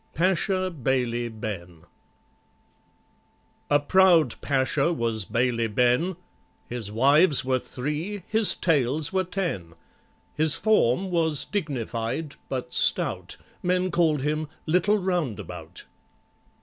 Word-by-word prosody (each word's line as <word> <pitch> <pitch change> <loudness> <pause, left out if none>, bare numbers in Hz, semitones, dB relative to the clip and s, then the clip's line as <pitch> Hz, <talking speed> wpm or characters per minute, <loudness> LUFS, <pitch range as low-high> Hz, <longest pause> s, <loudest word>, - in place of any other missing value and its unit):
PASHA 185 +2 +1
BAILEY 120 -2 0
BEN 90 -7 -7 1.9
A 145 - +4
PROUD 170 -3 +4
Pasha 140 +3 +1
was 115 - -1
BAILEY 115 +1 0
BEN, 125 - +1 0.5
His 115 -4 -2
wives 140 - +4
were 130 0 +1
three, 150 +11 -4
his 220 -1 +5
tails 150 0 0
were 190 0 +1
ten; 165 - -4 0.6
His 155 0 +3
form 190 - +1
was 160 -4 +2
dignified, 140 - -3
but 125 -2 -4
stout, - - +1 0.2
Men 180 +1 0
called 155 -6 +1
him 155 +1 -1 0.2
"Little 180 +6 +2
Roundabout." 115 - -4
145 Hz, 100 wpm, -25 LUFS, 120-180 Hz, 1.9 s, his